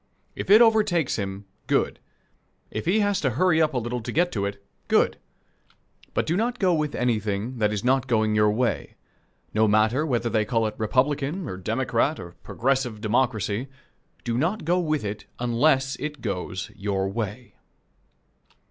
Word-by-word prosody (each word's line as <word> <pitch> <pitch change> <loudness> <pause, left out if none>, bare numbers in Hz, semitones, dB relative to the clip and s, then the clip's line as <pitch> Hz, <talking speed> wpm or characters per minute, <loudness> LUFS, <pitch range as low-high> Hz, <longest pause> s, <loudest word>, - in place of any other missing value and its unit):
If - - -5
it 215 +4 +9
overtakes 210 - +2
him, 100 -1 -4 0.2
good. - - +1 0.7
If - - -4
he 210 +5 +3
has 205 -1 +1
to 135 - +2
hurry 175 -2 +4
up 155 -3 +1
a - - +2
little 120 +1 -2
to - - -5
get 175 +2 +2
to 100 -2 -1
it, 100 0 -8 0.2
good. - - +3 1.0
But - - +1
do 165 - 0
not 235 +5 0
go 185 -6 +2
with 155 -2 -1
anything 110 0 -1
that 105 -1 +2
is 105 -1 -3
not 130 +1 +2
going 110 -3 +2
your 105 0 +4
way; 115 +3 -1 0.6
no 110 +1 +3
matter 110 +7 +3
whether 120 -6 0
they 110 -1 +1
call 115 +1 0
it 110 - -2
Republican, 140 - 0
or 95 - -4
Democrat, 115 - 0
or 85 - -8
Progressive 130 -3 -1
Democracy 110 0 0 0.6
do 120 0 -1
not 170 +4 -1
go 175 +2 +2
with 155 -8 -1
it 105 +1 -5
unless 135 +3 +2
it 150 -4 -5
goes 95 -2 -4
your 95 -1 -1
way. 110 +3 -5
125 Hz, 165 wpm, -25 LUFS, 105-155 Hz, 1.0 s, it